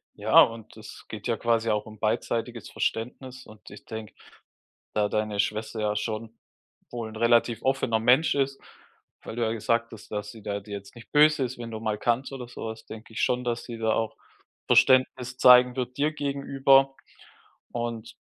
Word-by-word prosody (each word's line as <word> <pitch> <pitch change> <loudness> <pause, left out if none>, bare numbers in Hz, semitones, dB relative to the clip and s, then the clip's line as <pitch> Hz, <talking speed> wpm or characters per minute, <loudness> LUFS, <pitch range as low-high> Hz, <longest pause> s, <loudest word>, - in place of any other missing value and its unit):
Ja, - - +6
und 115 -1 -1
das 110 -1 -12
geht 110 +1 -6
ja 115 -2 0
quasi 115 -1 +1
auch 105 0 0
um 110 -1 -12
beidseitiges 115 0 -2
Verständnis. 125 +2 -4
Und 105 -3 -15
ich 100 - -13
denke, 110 -3 -8 0.8
da 105 -1 +2
deine 105 -1 -2
Schwester 110 +2 -1
ja 105 -1 0
schon 110 +1 -4 0.5
wohl 115 -2 -5
'n 110 - -11
relativ 115 0 +2
offener 130 -4 +1
Mensch 125 +7 +4
ist, 135 0 0 0.6
weil 110 - -7
du 120 - -1
ja 110 - 0
gesagt 115 +1 0
hast, 110 - -12
dass 105 -1 -4
sie 115 - -13
da 100 0 -3
dir 100 +1 -11
jetzt 100 +3 -8
nicht 115 - -14
böse 150 -1 +5
ist, 125 0 -4
wenn 115 -1 -7
du 110 - -5
mal 110 -1 -2
kannst 120 +5 0
oder 125 -3 -7
sowas, 110 -2 -7
denke 110 +1 -11
ich - - -3
schon, 125 0 +1
dass 120 -1 -2
sie 120 -2 -7
da 110 -1 +1
auch 110 0 -1 0.5
Verständnis 130 0 +3
zeigen 125 -1 +7
wird 125 0 -4
dir 150 +2 +1
gegenüber 135 -1 +2 0.8
und 120 -1 -4
115 Hz, 185 wpm, -26 LUFS, 110-125 Hz, 0.8 s, zeigen